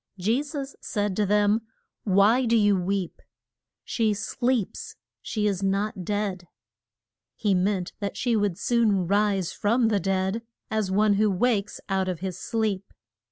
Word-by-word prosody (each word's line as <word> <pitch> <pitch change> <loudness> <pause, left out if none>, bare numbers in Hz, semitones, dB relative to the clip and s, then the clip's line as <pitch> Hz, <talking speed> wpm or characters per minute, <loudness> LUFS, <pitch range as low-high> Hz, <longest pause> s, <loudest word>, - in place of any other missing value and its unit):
Je 220 +8 +1
sus 280 -2 -6
said 205 -3 -2
to 210 0 +1
them, 210 +2 +3 0.4
Why 210 +6 +4
do 230 0 +4
you 205 -2 +4
weep? 185 0 -2 0.6
She 220 -3 0
sleeps; 250 - -2 0.3
she 215 -2 -2
is 200 -2 0
not 195 0 -1
dead. 195 -2 -2 0.9
He 205 -3 +1
meant 185 0 0
that 200 -2 -4
she 240 -2 +1
would 205 -5 0
soon 220 -6 +2
rise 200 -1 +1
from 230 +2 +2
the 210 -2 +2
dead, 190 +3 0 0.3
as 215 -3 0
one 205 +2 +3
who 215 - +4
wakes 205 +1 0
out 190 -1 0
of 180 -3 -3
his 185 0 -4
sleep. 210 -3 -2
205 Hz, 150 wpm, -26 LUFS, 190-220 Hz, 0.9 s, Why